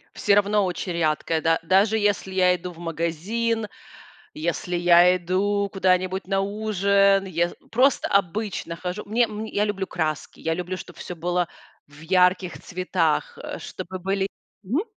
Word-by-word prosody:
Всё 205 - +3
равно 205 0 +3
очень 180 0 -3
рядкая, 160 0 0
да 165 0 +2
даже 195 +6 +3
если 205 -2 0
я 180 -1 +4
иду 180 +1 -7
в 165 - -16
магазин, 185 +8 -2 0.7
если 170 +2 -2
я 175 +1 +6
иду 200 +3 0
куда-нибудь 185 0 +1
на 195 0 +1
ужин, 200 -1 +2
ес 175 -1 -1 0.2
просто 255 +4 +3
обычно 200 -2 -1
хожу. 180 +4 -5
Мне 235 +3 +3
м, 215 0 -5
я 210 -1 0
люблю 200 -2 -2
краски. 155 -4 -3
Я 165 0 -1
люблю, 180 +2 -4
чтоб - - -11
всё 180 - -7
было 175 +1 -1 0.4
в 145 0 -17
ярких 180 +2 +2
цветах, 185 - -1
э, - - -6
чтобы 185 +1 -7
были 195 +1 -1 0.4
Мгм. 240 - 0
185 Hz, 150 wpm, -24 LUFS, 175-205 Hz, 0.7 s, я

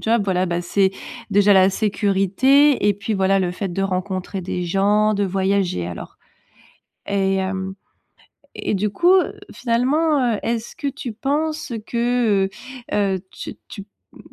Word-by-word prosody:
job, 225 0 +1
voilà, 185 -1 +1
bah, 175 0 -1
c'est 190 +2 +1 0.4
déjà 205 0 +5
la 190 0 +5
sécurité 210 +6 +3
et - - +5
puis 205 +2 -3
voilà 195 0 +2
le 180 -2 -1
fait 195 +1 -4
de 195 +2 -2
rencontrer 190 0 -3
des 180 0 -3
gens, 205 +4 +2
de 200 0 0
voyager, 190 - 0
alors? 90 - -8 0.9
Et 195 -1 +1
hem, 190 0 -3 0.8
et - - -2
du 205 +2 0
coup, 350 - +3
heu, 375 - +3 0.2
finalement, 255 +2 +1
heu, - - -5
est-ce 230 0 -3
que 290 -4 -4
tu 270 -3 -5
penses 305 +4 -2
que, 235 -4 +1
heu - - -4 0.4
heu, 195 -2 +1
tu - - -8
tu, 200 -1 -9 0.3
mmh, - - -17
200 Hz, 155 wpm, -21 LUFS, 190-235 Hz, 0.9 s, déjà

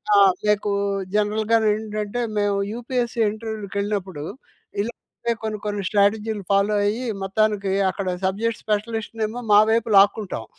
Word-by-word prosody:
ఆ! - - +6 0.3
మీకు 210 0 +2 0.4
జనరల్‌గాను 215 +1 +2
ఏంటంటే 215 +1 -3 0.2
మేము 205 -1 +2 0.2
యూపీఎస్‌సి 240 0 -2
ఇంటర్వ్యూ‌లకేళ్ళినప్పుడు 200 -5 -4 0.6
ఇలా 230 +4 -3 0.3
పే 235 - +4
కొన్ని, 215 -1 -2
కొన్ని 205 -1 -2
స్ట్రాటజీలు 210 +1 +1
ఫాలో 200 +1 +3
అయ్యి, 225 +5 -1 0.2
మొత్తానికి 200 0 +1 0.2
అక్కడ 195 -1 -5 0.2
సబ్జెక్ట్స్ 210 +4 -1
స్పెసిలిస్ట్‌నేమో 220 +1 -2
మా 205 - +9
వైపు 230 0 +1
లాక్కుంటాం. 200 - +3
210 Hz, 120 wpm, -23 LUFS, 205-225 Hz, 0.6 s, మా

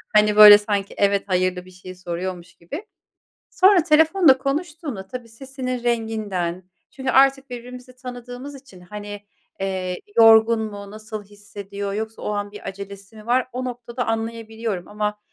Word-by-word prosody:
Hani, 210 0 +5
böyle 210 -1 +11
sanki 205 -1 -3
"evet, 200 0 +2
hayır"lı 185 -1 0
bir 185 - -15
şey 185 0 -11
soruyormuş 180 0 -6
gibi. 295 - -8 0.6
Sonra 375 -3 +5
telefonda 320 -2 +5
konuştuğunda 285 - -4
tabii 240 +2 -8
sesinin 255 +1 -6
renginden 215 -7 -2 0.3
çünkü 265 -1 -4
artık 270 0 +4
birbirimizi 250 +1 -9
tanıdığımız 250 +2 -8
için, 260 -9 -15
hani, 205 +2 -9 0.3
eee, 185 -2 -3 0.2
yorgun 225 0 +6
mu, 205 -2 -7
nasıl 215 0 -8
hissediyor, 200 0 -7
yoksa 220 +1 -5
o - - -3
an 205 0 -3
bir 210 - -10
acelesi 200 +1 -9
mi 215 -1 -13
var, 250 +2 +1
o 255 +1 -4
noktada 245 0 -5
anlayabiliyorum. 225 -4 -3
Ama, 210 0 -3
220 Hz, 145 wpm, -22 LUFS, 200-250 Hz, 0.6 s, böyle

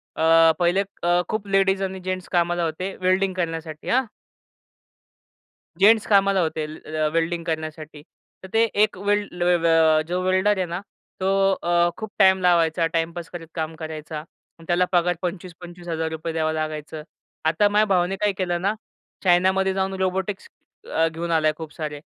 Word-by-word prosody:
अ, 165 0 +5
पहिले 175 +3 +2 0.2
अ, 175 +1 +3
खूप 215 -2 -3
लेडीज 195 0 +2
आणि 190 0 -4
जेन्ट्स 185 0 -4
कामाला 175 -1 +1
होते 175 +4 -3
वेल्डिंग 185 +1 +2
करण्यासाठी 165 -3 -4
हां? 260 +1 +2 1.7
जेन्टस 215 +3 +5
कामाला 195 -1 +4
होते. 160 -2 -2
ल 155 - -9
अ, 155 0 -1
वेल्डिंग 165 +1 0
करण्यासाठी. 155 -1 -5 0.4
तर - - -8
ते 225 +1 +4 0.2
एक 215 -3 0
वेल्ड 205 0 0
ल 175 0 -3 0.2
अ, 160 -1 +4
जो 180 +1 -1
वेल्डर 190 +2 +2
आहे 185 - 0
ना 175 +2 -5 0.4
तो 190 0 0 0.3
अ, 175 0 +3
खूप 220 -1 -7
टाईम 190 -1 +5
लावायचा 170 -2 +3
टाईमपास 165 +1 -2
करत 170 -2 -8
काम 160 0 -3
करायचा. 155 -1 -6 0.4
त्याला 180 +1 +2
पगार 175 0 +2
25-₹25,000 170 -3 -5
द्यावं 160 -1 0
लागायचं. 155 0 -4 0.4
आता 165 +6 +3
माझ्या 210 +1 +3
भावाने 185 -1 +1
काय 210 -1 +3
केलं 175 -2 -1
ना? 200 +3 +1 0.5
चायनामध्ये 190 +1 +3
जाऊन 190 0 -1
रोबोटिक्स 190 +1 -2 0.5
अ, 165 0 +3
घेऊन 165 +1 -4
आला 155 -1 +3
खूप 160 -2 -8
सारे. 150 -2 -5
175 Hz, 155 wpm, -23 LUFS, 160-190 Hz, 1.7 s, अ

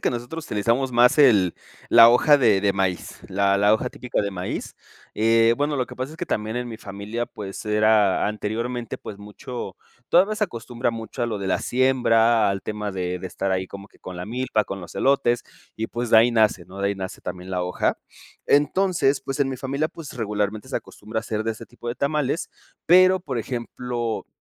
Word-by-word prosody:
que - - +1
nosotros 125 +7 -5
utilizamos 115 +6 0
más 120 +4 +4
el 105 - +5 0.4
la 115 0 +9
hoja 145 +5 +5
de 105 -6 +3
de 100 - +3
maíz, 95 -2 -2
la 100 +1 +2
la 105 +2 +5
hoja 125 +3 -2
típica 125 - -3
de 100 - -2
maíz. 90 -1 -5 0.4
Eh, 115 +1 +4
bueno, 145 0 0
lo 130 - 0
que - - -10
pasa 130 +4 -5
es - - -11
que - - -4
también 110 +2 -2
en 125 - -2
mi 115 -2 -8
familia, 105 +4 -5
pues 100 +1 -8
era 105 -2 +3
anteriormente, 115 +3 -3
pues 100 - -9
mucho, 105 0 -8 0.3
todavía 195 +5 +4
se 210 - +1
acostumbra 120 - -3
mucho 115 +2 -7
a 120 - +1
lo 110 - -3
de 95 - -4
la 95 - +1
siembra, 120 -4 +3
al 100 -1 -2
tema 105 -1 -4
de 90 -1 -3
de 95 - -6
estar 95 +1 -3
ahí 95 0 -1
como 100 +1 -10
que - - -25
con 90 - -9
la 90 - -5
milpa, 120 -1 -1
con 95 - -6
los 85 - -11
elotes, 130 -3 +2 0.3
y, 110 - -2
pues, 120 0 -3
de 110 - +6
ahí 115 +2 +6
nace, 110 -6 +2
¿no? 95 +3 -12
De 100 0 +1
ahí 100 - -1
nace 95 -1 -7
también 90 +1 -7
la 90 -1 -1
hoja. 90 0 -1 0.5
Entonces, 145 -1 +2
pues, 135 +2 -5
en 135 - +2
mi 130 - -4
familia, 140 +4 -1
pues, 165 -4 -10
regularmente 105 -2 -2
se - - -1
acostumbra 110 +2 -6
hacer 110 -1 -3
de 115 - 0
ese 110 - -11
tipo 120 -1 -13
de 120 - -2
tamales, 150 +2 -1 0.4
pero, 185 +1 +6
por 135 -8 -4
ejemplo, 120 -1 -4
115 Hz, 210 wpm, -23 LUFS, 100-130 Hz, 0.5 s, la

